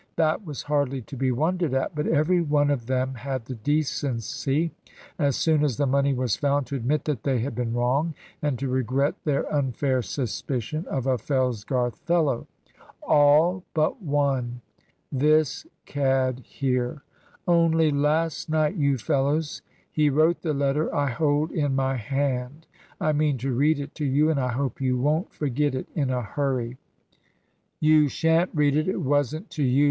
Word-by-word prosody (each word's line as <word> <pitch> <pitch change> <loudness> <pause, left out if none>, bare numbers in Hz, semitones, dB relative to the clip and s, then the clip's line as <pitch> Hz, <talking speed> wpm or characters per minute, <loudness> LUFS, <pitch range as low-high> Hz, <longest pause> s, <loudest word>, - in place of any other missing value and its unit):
That 160 +5 +1
was 150 -6 -6
hardly 140 -3 0
to 140 - -10
be 130 0 0
wondered 160 +2 0
at. 135 - -1
But 150 0 -2
every 175 +4 +3
one 145 -2 +2
of 120 -5 -2
them 130 0 0
had 130 -1 -4
the 130 - -6
decency, 140 +3 -1 0.5
as 140 -4 +2
soon 155 -2 +2
as 140 -6 0
the 145 - +1
money 140 +1 +2
was 125 -4 0
found, 145 -1 +1
to 140 - -5
admit 135 +4 -1
that 145 -7 -2
they 135 -3 0
had 135 +3 -3
been 115 0 -2
wrong, 135 +7 +1 0.3
and 145 -4 0
to 135 +3 -3
regret 130 +2 +1
their 145 -3 +1
unfair 135 -2 0
suspicion 130 - -3
of 130 -3 -2
a 130 -2 +1
Fellsgarth 125 -1 -1
fellow. 160 -8 0 0.6
All 155 +5 +4
but 155 +9 +1
one 135 -6 -1 0.5
this 155 - +2 0.2
cad 130 -2 0
here! 125 0 -2 0.4
Only 165 -2 +4
last 150 +3 0
night, 155 +2 +1
you 140 -3 +2
fellows, 145 +3 0 0.3
he 150 -1 +2
wrote 155 +4 +2
the 155 -4 -1
letter 140 +2 0
I 145 -3 +1
hold 150 +4 +1
in 145 -4 0
my 135 0 +1
hand. 135 +3 -2 0.3
I 155 - +1
mean 150 -2 +1
to 130 +2 -2
read 145 +4 +2
it 145 +1 -6
to 150 - -2
you, 145 +4 +3
and 145 - 0
I 125 -1 0
hope 135 0 -2
you 130 -1 +1
won't 150 +7 0
forget 145 -1 -1
it 130 - -4
in 140 -4 0
a 125 -1 -1
hurry." 130 0 -2 1.0
"You 155 -1 +5
shan't 165 +5 +2
read 145 -2 +3
it; 155 +2 +1
it 185 0 -1
wasn't 145 - 0
to 150 - -2
you!" 130 +1 +3
140 Hz, 170 wpm, -25 LUFS, 130-155 Hz, 1.0 s, You